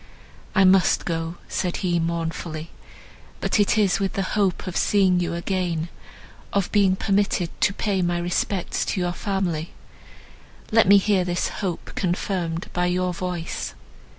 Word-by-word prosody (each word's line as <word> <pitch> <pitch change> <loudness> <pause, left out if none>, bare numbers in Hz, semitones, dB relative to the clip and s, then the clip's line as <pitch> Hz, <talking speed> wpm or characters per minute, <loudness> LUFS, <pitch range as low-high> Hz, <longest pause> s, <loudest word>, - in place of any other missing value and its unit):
"I 195 - +6
must 190 0 +4
go," 165 0 -2
said 180 -1 -2
he 175 -1 +2
mournfully, 165 -1 -3 0.7
"but - - 0
it 205 +1 +3
is 205 -4 +3
with 195 -1 -1
the 195 - -1
hope 200 -4 +1
of 185 - -5
seeing 190 -3 +3
you 170 -1 -1
again, 170 -2 -2 0.6
of 200 -2 0
being 195 -3 +4
permitted 195 -3 +1
to - - +4
pay 200 -1 -1
my 175 -1 +1
respects 175 +2 -1
to - - -1
your 175 -1 0
family; 175 -5 -2 1.0
let 225 -2 +5
me 200 +1 +8
hear 200 -1 +2
this 175 0 -1
hope 185 -5 -4
confirmed 175 -2 -2
by 180 0 +1
your 180 0 0
voice." 175 -1 -4
180 Hz, 150 wpm, -24 LUFS, 170-195 Hz, 1.0 s, me